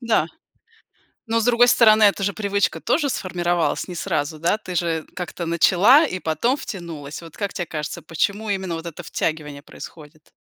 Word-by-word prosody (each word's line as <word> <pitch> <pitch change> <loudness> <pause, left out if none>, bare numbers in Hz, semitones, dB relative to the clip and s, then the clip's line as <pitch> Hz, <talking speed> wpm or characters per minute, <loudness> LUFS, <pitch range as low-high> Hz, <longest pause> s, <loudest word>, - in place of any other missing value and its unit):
Да, 230 -9 +1 1.0
но, 230 - +2
с - - -1
другой 245 0 +5
стороны, 220 -3 +6
это 200 -1 +4
же 200 - +1
привычка 200 -5 0
тоже 290 -3 +1
сформировалась 175 -6 -1
не 180 - -7
сразу, 155 -1 -2
да, 170 +6 +1
ты 185 -4 -8
же 165 -2 -1
как-то 180 -1 -5
начала 190 - +5
и 185 -10 -4
потом 165 - 0
втянулась. 165 - -7
Вот 165 -2 -13
как 200 -2 -3
тебе 175 - -3
кажется, 150 -2 -5
почему 200 +6 -2
именно 190 -4 -2
вот 165 +1 -7
это 170 +1 -7
втягивание 150 -2 -3
происходит? 155 +1 -13
175 Hz, 170 wpm, -22 LUFS, 160-210 Hz, 1.0 s, стороны